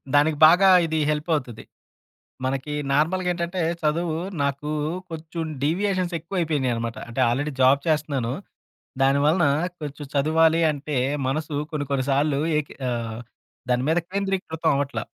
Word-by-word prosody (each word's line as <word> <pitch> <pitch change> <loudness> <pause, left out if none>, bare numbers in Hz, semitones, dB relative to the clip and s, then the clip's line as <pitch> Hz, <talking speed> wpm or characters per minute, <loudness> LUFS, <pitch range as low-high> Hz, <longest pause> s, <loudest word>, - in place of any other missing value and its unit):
దానికి 150 +1 +4
బాగా 180 +4 +6 0.2
ఇది 160 0 -1
హెల్పవుతది. 150 -6 -2 0.8
మనకి 135 +3 -2 0.2
నార్మల్‌గేంటంటే 175 +3 0 0.2
చదువు 160 +1 0 0.3
నాకు 140 +1 -2 0.4
కొంచెం 165 +1 -5 0.2
డీవియేషన్సెక్కువైపోయినియనమాట. 165 - -1
అంటే, 120 - -5
ఆల్రెడీ 145 +5 -1
జాబ్ 135 +2 +5
చేస్తున్నాను. 145 -6 0 0.7
దాని 135 +1 +4
వలన 165 +3 +3 0.4
కొంచెం 145 0 -6
చదువాలి 160 +3 +3
అంటే 145 -1 -4 0.3
మనసు 150 +3 -2 0.2
కొన్ని, 145 -2 -2
కొన్ని 135 -1 +1
సార్లు 140 +1 +2 0.2
ఏకి 150 - -3 0.2
ఆహ్, 115 -2 -3 0.5
దాని 125 +1 +2
మీద 170 +2 +3
కేంద్రీకృతం 190 -5 -1
అవట్లా. 140 0 -2
150 Hz, 115 wpm, -24 LUFS, 140-165 Hz, 0.8 s, బాగా